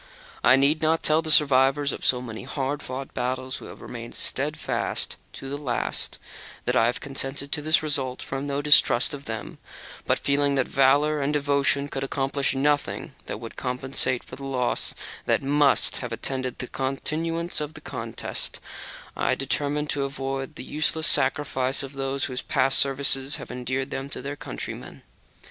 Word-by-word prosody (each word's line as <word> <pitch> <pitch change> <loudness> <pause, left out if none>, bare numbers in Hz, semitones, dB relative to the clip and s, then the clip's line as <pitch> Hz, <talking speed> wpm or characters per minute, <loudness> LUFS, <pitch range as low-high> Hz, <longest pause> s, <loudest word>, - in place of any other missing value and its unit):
I 130 - +7
need 140 +4 +3
not 160 +1 +2
tell 155 +1 +4
the 160 - -5
survivors 140 -1 +5
of - - -6
so 125 -1 +2
many 115 -3 -6
hard 140 +1 -3
fought 130 +1 -6
battles, 130 +1 -2
who - - -10
have - - -11
remained 120 -1 -8
steadfast 150 +3 -2 0.2
to 135 - -8
the 140 +1 -4
last, 130 -5 -2 0.5
that - - +1
I 115 - +5
have 120 - -1
consented 140 +1 -3
to 150 - 0
this 155 +1 +3
result 135 -4 -1
from 135 +1 -4
no 140 0 -2
distrust 145 -2 +5
of 140 -1 -7
them: 110 -1 -6 0.5
but, - - +3
feeling 140 0 +1
that 135 -2 +1
valour 145 +3 +3
and 140 +1 +1
devotion 140 -1 +2
could 135 -1 -4
accomplish 135 0 0
nothing 145 +2 0
that - - -4
could 115 -1 -8
compensate 130 0 +1
for - - -10
the 140 - -9
loss 130 -3 0 0.3
that - - +2
would 145 0 +3
have 125 -2 -5
attended 130 +2 -2
the 125 - -5
continuation 160 +6 -2
of 150 +1 -7
the - - -7
contest, - - -4 0.6
I - - 0
have - - +2
determined 145 +2 0
to 140 -1 0
avoid 135 0 -4
the - - -7
useless 155 +3 +1
sacrifice 135 -1 +1
of 135 0 -7
those 135 0 -1
whose 125 -1 -3
past 135 +1 +4
services 135 0 +3
have - - -6
endeared 130 +2 -3
them 135 +1 -4
to - - -4
their 140 +1 -4
countrymen. - - -7
135 Hz, 175 wpm, -25 LUFS, 130-145 Hz, 0.6 s, I